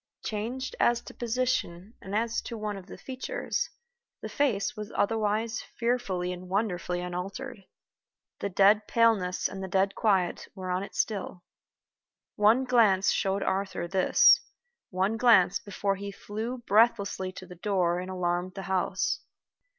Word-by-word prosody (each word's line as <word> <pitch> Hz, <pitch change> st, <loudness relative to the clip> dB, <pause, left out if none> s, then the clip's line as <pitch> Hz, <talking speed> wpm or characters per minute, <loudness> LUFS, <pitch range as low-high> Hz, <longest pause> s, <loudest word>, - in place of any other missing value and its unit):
Changed 235 Hz, +5 st, -3 dB
as 240 Hz, 0 st, +3 dB
to -, -, -11 dB
position 230 Hz, -5 st, -2 dB
and 195 Hz, +2 st, -5 dB
as 230 Hz, +1 st, 0 dB
to 230 Hz, -, -7 dB
one 210 Hz, -1 st, -3 dB
of 195 Hz, -1 st, -10 dB
the -, -, -10 dB
features, 270 Hz, -, -3 dB, 0.5 s
the -, -, -6 dB
face 245 Hz, -7 st, 0 dB
was 210 Hz, -1 st, -7 dB
otherwise 220 Hz, +2 st, 0 dB, 0.2 s
fearfully 200 Hz, -7 st, -1 dB
and 180 Hz, 0 st, -9 dB
wonderfully 180 Hz, -3 st, -1 dB
unaltered. 195 Hz, +6 st, -6 dB, 0.7 s
The 200 Hz, -, -2 dB
dead 200 Hz, +3 st, +4 dB
paleness 220 Hz, -6 st, +2 dB
and 190 Hz, -, -7 dB
the -, -, -4 dB
dead 190 Hz, +2 st, +1 dB
quiet 195 Hz, -5 st, +1 dB
were 185 Hz, -1 st, -4 dB
on 180 Hz, +1 st, 0 dB
it 200 Hz, -, -8 dB
still. 195 Hz, -4 st, -2 dB, 0.9 s
One 220 Hz, +5 st, +4 dB
glance 220 Hz, -7 st, +4 dB
showed 195 Hz, +1 st, 0 dB
Arthur 190 Hz, -2 st, -2 dB
this 185 Hz, +1 st, +5 dB, 0.5 s
one 190 Hz, +4 st, 0 dB
glance 225 Hz, -7 st, +5 dB
before 200 Hz, -1 st, -2 dB
he 200 Hz, +1 st, -6 dB
flew 220 Hz, +5 st, -5 dB
breathlessly 200 Hz, -3 st, +2 dB
to -, -, -9 dB
the 180 Hz, -, -11 dB
door 180 Hz, -1 st, 0 dB
and 185 Hz, +1 st, -6 dB
alarmed 180 Hz, 0 st, -2 dB
the 195 Hz, -, -5 dB
house. 190 Hz, 0 st, 0 dB
200 Hz, 145 wpm, -28 LUFS, 185-225 Hz, 0.9 s, this